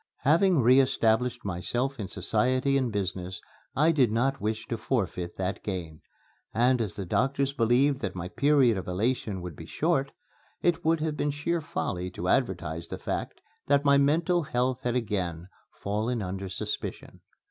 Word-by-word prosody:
Having 165 Hz, 0 st, +4 dB
re 130 Hz, +3 st, +6 dB
established 125 Hz, -3 st, +1 dB
myself 120 Hz, +9 st, -2 dB
in 100 Hz, -, -3 dB
society 130 Hz, +8 st, +1 dB
and 130 Hz, -4 st, +1 dB
business 95 Hz, -2 st, -3 dB, 0.4 s
I 155 Hz, +4 st, +4 dB
did 130 Hz, -8 st, +3 dB
not 135 Hz, +5 st, 0 dB
wish 110 Hz, +1 st, -2 dB
to 115 Hz, -, -1 dB
forfeit 90 Hz, -7 st, -2 dB
that 95 Hz, +1 st, -2 dB
gain; 85 Hz, -6 st, -5 dB, 0.5 s
and 125 Hz, +2 st, +3 dB
as 105 Hz, -5 st, -2 dB
the 100 Hz, -2 st, -4 dB
doctors 135 Hz, +8 st, 0 dB
believed 130 Hz, +3 st, +3 dB
that 95 Hz, -7 st, -4 dB
my 90 Hz, 0 st, -4 dB
period 135 Hz, -3 st, +3 dB
of -, -, -8 dB
elation 100 Hz, 0 st, -1 dB
would 90 Hz, -4 st, -6 dB
be 80 Hz, -, -10 dB
short, 145 Hz, -4 st, 0 dB, 0.5 s
it 175 Hz, -2 st, +2 dB
would 160 Hz, 0 st, +2 dB
have 155 Hz, -1 st, -1 dB
been 145 Hz, -, 0 dB
sheer 155 Hz, +4 st, -1 dB
folly 90 Hz, -, -3 dB
to -, -, -4 dB
advertise 80 Hz, +2 st, 0 dB
the -, -, -5 dB
fact -, -, -4 dB, 0.3 s
that 140 Hz, 0 st, +3 dB
my 140 Hz, 0 st, +6 dB
mental 165 Hz, +5 st, +2 dB
health 130 Hz, -2 st, -1 dB
had 125 Hz, -1 st, -1 dB
again 95 Hz, -7 st, -2 dB, 0.2 s
fallen 110 Hz, +3 st, -2 dB
under 95 Hz, +1 st, -4 dB
suspicion. -, -, -5 dB
120 Hz, 165 wpm, -28 LUFS, 95-140 Hz, 0.5 s, re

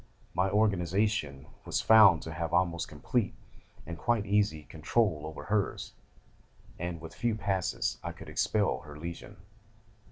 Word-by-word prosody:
My 95 Hz, +2 st, +1 dB
organisation 95 Hz, -7 st, +1 dB, 0.2 s
was -, -, -1 dB
found 100 Hz, -7 st, +7 dB
to 80 Hz, -, -6 dB
have 80 Hz, +1 st, -3 dB
almost 85 Hz, -2 st, +1 dB
complete, 100 Hz, -, -1 dB, 0.5 s
and 85 Hz, -1 st, -7 dB
quite 115 Hz, +1 st, +1 dB
easy, 100 Hz, -7 st, +1 dB
control 80 Hz, +2 st, 0 dB
over 80 Hz, -, -8 dB
hers, 105 Hz, -2 st, -1 dB, 0.9 s
and 85 Hz, -1 st, -4 dB
with 80 Hz, 0 st, -9 dB
a -, -, -18 dB
few 120 Hz, -2 st, 0 dB
passes 95 Hz, -3 st, -1 dB
I -, -, -3 dB
could -, -, -12 dB
expel 105 Hz, -3 st, +1 dB
her 75 Hz, -2 st, -11 dB
Legion. 85 Hz, +2 st, -8 dB
90 Hz, 140 wpm, -30 LUFS, 80-105 Hz, 0.9 s, found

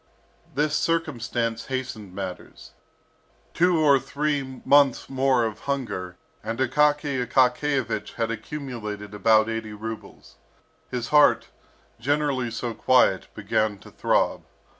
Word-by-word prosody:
This 150 Hz, +1 st, +1 dB
circumstance 120 Hz, -9 st, -1 dB
hastened 125 Hz, -8 st, -5 dB
matters. 95 Hz, -2 st, -7 dB, 0.8 s
Two 180 Hz, 0 st, +3 dB
or 145 Hz, -3 st, +5 dB
three 140 Hz, -1 st, -2 dB
months 140 Hz, -3 st, +4 dB
more 130 Hz, -2 st, +2 dB
of 110 Hz, -1 st, -4 dB
hunger 95 Hz, -10 st, -3 dB, 0.3 s
and 115 Hz, -, -3 dB
Akaky 145 Hz, 0 st, +2 dB
Akakiyevich 125 Hz, -2 st, +1 dB
had 115 Hz, -1 st, -1 dB
accumulated 110 Hz, -4 st, -6 dB
about 110 Hz, +1 st, +4 dB
eighty 115 Hz, -1 st, -4 dB
rubles. 105 Hz, -, -9 dB, 0.5 s
His 120 Hz, -2 st, -4 dB
heart, 150 Hz, -1 st, +5 dB, 0.5 s
generally 140 Hz, -1 st, 0 dB
so 115 Hz, +1 st, -4 dB
quiet, 125 Hz, -6 st, +3 dB
began 110 Hz, -1 st, 0 dB
to -, -, -15 dB
throb. -, -, +1 dB
125 Hz, 110 wpm, -25 LUFS, 110-140 Hz, 0.8 s, or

